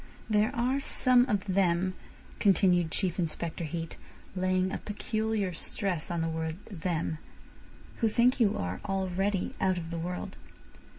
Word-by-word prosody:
There 215 0 +3
are 255 +3 +1
some 255 -2 +4
of 205 -6 0
them," 185 -1 +2 0.5
continued 180 -4 +4
Chief 185 +1 0
Inspector 170 0 -2
Heat, 165 +1 -5 0.4
laying 185 0 +1
a - - -3
peculiar 215 -2 -1
stress 175 0 -2
on 170 -1 -1
the 165 - 0
word 160 0 -2 0.2
"them," 165 -3 -2 0.8
"who 225 - +2
think 245 +4 +3
you 215 -4 +3
are 90 +1 -3
already 195 0 -1
out 185 -1 +2
of 165 -1 -5
the 170 - -3
world." 180 +2 -4
185 Hz, 140 wpm, -30 LUFS, 170-210 Hz, 0.8 s, some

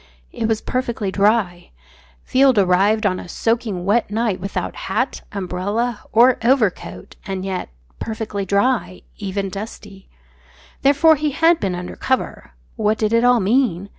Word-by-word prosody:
It 225 - -2
was 225 -1 0
perfectly 235 -6 -2
dry; 200 -3 +1 0.5
Field 265 -2 +3
arrived 200 +3 +3
on 185 -2 +1
a - - -10
soaking 225 -4 -1
wet 215 +3 +1
night 215 -2 -1
without 195 +2 -4
hat, - - -2
umbrella, 205 +5 -2
or 240 +3 +5
overcoat, 235 -6 0
and 190 -1 -4
yet 190 - -4 0.3
perfectly 220 -2 -4
dry, 200 0 0 0.2
even 195 -1 -3
dusty. 200 -1 -9 0.7
Therefore 290 +3 +5
he 300 +1 0
had 325 +4 +3
been 190 -3 -2
under 180 0 -6
cover. 260 -1 -2 0.2
What 215 0 +1
did 215 0 0
it 230 +1 +3
all 245 -1 +5
mean? 200 -3 +1
215 Hz, 140 wpm, -20 LUFS, 195-240 Hz, 0.7 s, or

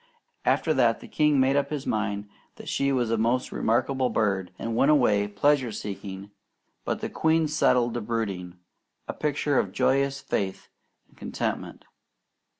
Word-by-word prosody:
After 160 - +2
that 120 -4 +3
the - - -11
king 150 -2 +2
made 130 +1 +3
up 140 -1 +1
his 150 -3 -4
mind 105 -1 -2 0.3
that - - -12
she 140 0 0
was 120 -4 0
a 115 - +1
most 120 +3 +1
remarkable 130 +3 +1
bird, 95 -5 0
and 115 0 -3
went 135 +5 +3
away 110 -9 +4
pleasure 130 +4 +2
seeking; 100 -1 -7 0.5
but - - -3
the - - -2
queen 160 0 +2
settled 125 -5 +2
to 120 - -3
brooding, 100 -6 -3 0.5
a - - -3
picture 145 -2 0
of - - -1
joyous 140 +1 +1
faith 100 -8 -3 0.4
and - - -27
contentment. - - -4
120 Hz, 155 wpm, -26 LUFS, 105-140 Hz, 0.5 s, away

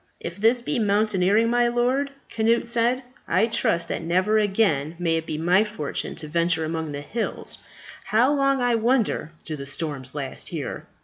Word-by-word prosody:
"If 170 +2 -6
this 230 +4 +3
be 260 +1 -1
mountaineering, 210 0 +2
my 240 0 +3
lord," 250 +4 +1 0.3
Cnut 230 +1 +2
said, 240 +2 +1 0.2
"I 185 +6 +3
trust 220 -7 0
that - - -2
never 185 +6 +2
again 190 -8 +1
may 165 -2 +1
it 160 - -4
be 155 - -3
my 175 +5 +4
fortune 210 -9 -4
to 155 - -7
venture 165 +1 +1
among 160 -1 -3
the 145 0 -5
hills. 225 +9 -3 0.5
How 240 +6 +3
long, 275 -2 +2
I 245 -1 +2
wonder, 230 -8 +1
do 155 - -4
the 140 -1 -7
storms 140 -2 -4
last 140 -2 -4
here? - - -5
205 Hz, 175 wpm, -24 LUFS, 160-235 Hz, 0.5 s, my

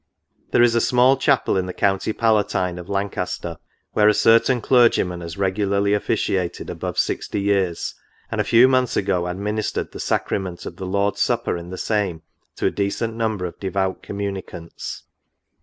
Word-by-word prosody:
" - - -43
There 120 - +5
is 120 -1 +4
a 115 - +3
small 125 +2 +4
chapel, 135 0 +2
in 95 -1 -1
the 90 - -5
county 95 +1 +1
palatine 105 -5 +1
of 90 +2 -10
Lancaster, 95 -4 -3 0.4
where 105 - +4
a 105 - +5
certain 115 +4 +4
clergyman 115 -8 +3
has 85 +1 -7
regularly 100 +1 +1
officiated 95 -3 -1
above - - -5
sixty 105 - -1
years, 100 -4 0 0.4
and - - 0
a - - 0
few 120 +2 +6
months 130 -2 +2
ago 90 -3 0
administered 105 +4 -3
the - - -9
sacrament 90 -3 -2
of - - -7
the 95 - -5
Lord's 100 +1 0
Supper - - +1
in 85 0 -7
the 95 - -6
same, 95 -8 -1 0.3
to - - -3
a - - +3
decent 105 +3 -2
number 110 -4 -2
of 85 - -7
devout 95 -1 -2
communicants. 95 -4 -6
100 Hz, 170 wpm, -22 LUFS, 90-110 Hz, 0.4 s, few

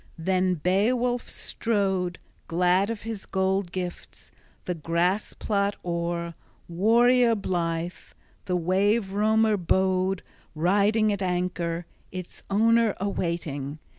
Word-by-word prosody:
Then 185 +2 +1
Beowulf 235 +9 +1
strode, 190 -5 -1 0.3
glad 180 +4 +2
of 230 -2 -4
his 225 -3 -6
gold 190 -1 0
gifts, 180 -1 -6 0.3
the 180 - -1
grass 170 +5 0
plot 200 -1 0
o'er, 170 0 -2 0.3
warrior 230 +6 +4
blithe. 175 -3 -2 0.5
The 180 - 0
wave 190 +4 +1
roamer 215 +1 +3
bode 190 +1 +1 0.3
riding 205 +6 +3
at 200 - -4
anchor, 175 -2 -1 0.3
its 185 -1 -7
owner 225 +1 +3
awaiting. 170 -7 -3
190 Hz, 105 wpm, -26 LUFS, 175-210 Hz, 0.5 s, warrior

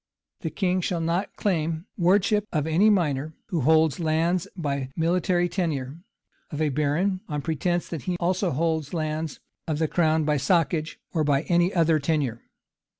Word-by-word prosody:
The 160 - -3
king 185 +1 0
shall 175 0 -1
not 170 +4 -1
claim 165 -3 -1
the - - -8
wardship 205 +3 +3
of 150 -3 0
any 170 +7 +4
minor 155 -6 0
who 170 -7 0
holds 155 +1 +3
lands 165 +2 +1
by 140 -5 -2
military 175 +1 +1
tenure, 160 -5 -3 0.5
of 150 - -5
a 155 -1 +2
baron, 155 +7 0
on 150 -2 -3
pretence 175 +2 -1
that 160 -7 -6
he 180 -1 -1
also 185 +2 +1
holds 160 +1 -1
lands 155 -1 -3 0.3
of 155 -2 -1
the 160 0 +1
crown, 160 -1 +2
by 150 0 +1
soccage 160 +2 +1 0.2
or 160 -3 +1 0.2
any 175 +1 +3
other 165 -3 +3
tenure. 140 -6 -1
160 Hz, 160 wpm, -25 LUFS, 155-175 Hz, 0.5 s, any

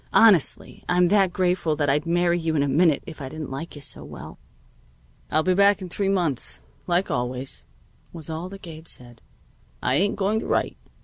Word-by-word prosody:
Honestly, 210 -9 +4
I'm 180 0 +4
that 195 -2 +4
grateful 180 -3 +1
that 145 -1 0
I'd 150 +4 +1
marry 175 0 +2
you 160 -1 -1
in 145 - +3
a - - 0
minute 155 +2 +3
if 160 -2 -9
I 135 - -5
didn't 155 -1 -7
like 155 +6 -6
you 145 - -8
so - - -2
well." - - -10 0.9
"I'll 155 - +2
be 185 - +3
back 200 +2 +5
in 185 -2 -7
three 195 +2 0
months, 170 -10 -1 0.2
like 180 +2 +1
always," 125 +2 -3 0.4
was 165 -3 -7
all 165 +3 -4
that 195 0 -11
Gabe 160 -1 -10
said. 120 -4 -7 0.6
"I 130 - +2
ain't 200 +4 +2
going 205 +2 +1
to - - -6
write. - - 0
170 Hz, 195 wpm, -24 LUFS, 145-185 Hz, 0.9 s, back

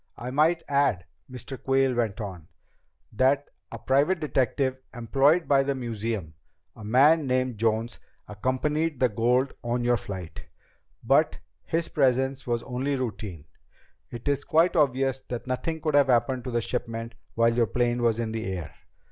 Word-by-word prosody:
"I 125 +1 -5
might 160 +5 +2
add," 140 -11 +1 0.2
Mr. 130 +1 -8
Quayle 135 -1 +2
went 115 -3 -1
on, 95 -7 -7 0.7
"that 135 +5 +2 0.2
a - - -6
private 145 +7 +2
detective 130 -2 0 0.2
employed 135 +8 +2
by 140 -1 +4
the 140 0 -1
museum, 110 -8 -4 0.4
a 110 - -11
man 140 +7 +4
named 130 -3 0
Jones, 115 +1 0 0.3
accompanied 135 +7 -1
the 125 - +3
gold 125 +5 +1
on 120 +1 -1
your 120 0 +3
flight. 95 -5 -8 0.6
But 140 +6 +3 0.3
his 165 +1 -1
presence 135 -1 +1
was 120 -1 -1
only 135 +3 -2
routine. 105 - -5 0.6
It 120 +3 -8
is 140 0 +1
quite 165 +4 +3
obvious 135 -3 +2
that 120 -1 -4
nothing 145 +6 -3
could 155 -1 -1
have 145 -1 +5
happened 125 0 +1
to - - -3
the 120 0 0
shipment 115 -1 -4 0.2
while 115 0 +3
your 115 -1 +2
plane 120 +2 0
was 115 -2 +2
in 115 -1 -2
the 110 -3 -3
air. 80 -5 -6
125 Hz, 155 wpm, -26 LUFS, 115-140 Hz, 0.7 s, have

